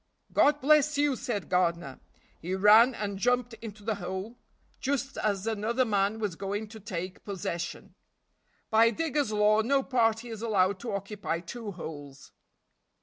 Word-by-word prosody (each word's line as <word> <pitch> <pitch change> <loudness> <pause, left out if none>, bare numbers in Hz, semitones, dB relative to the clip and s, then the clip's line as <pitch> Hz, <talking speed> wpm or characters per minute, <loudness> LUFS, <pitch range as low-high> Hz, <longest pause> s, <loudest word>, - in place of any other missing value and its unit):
"God 295 0 +4
bless 300 +1 +4
you!" 290 -2 +2
said 215 -6 -4
Gardiner. 170 -6 0 0.4
He 180 +3 -2
ran 215 +6 +6
and 200 -2 -4
jumped 245 +1 +1
into 215 -2 -9
the 220 +1 0
hole 190 +6 -5 0.4
just 275 0 -2
as 200 -2 -1
another 225 +3 0
man 205 -1 +1
was 210 -6 -3
going 200 +3 -4
to 220 0 -10
take 185 -3 -6
possession. 175 -4 -5 0.8
By 225 +1 +6
digger's 295 -2 -1
law 210 +1 +4
no 270 +4 +2
party 235 -2 +1
is 220 -2 -7
allowed 200 -4 +1
to 235 - -5
occupy 200 -4 -3
two 210 +3 -7
holes. 145 -5 -9
215 Hz, 145 wpm, -29 LUFS, 190-240 Hz, 0.8 s, ran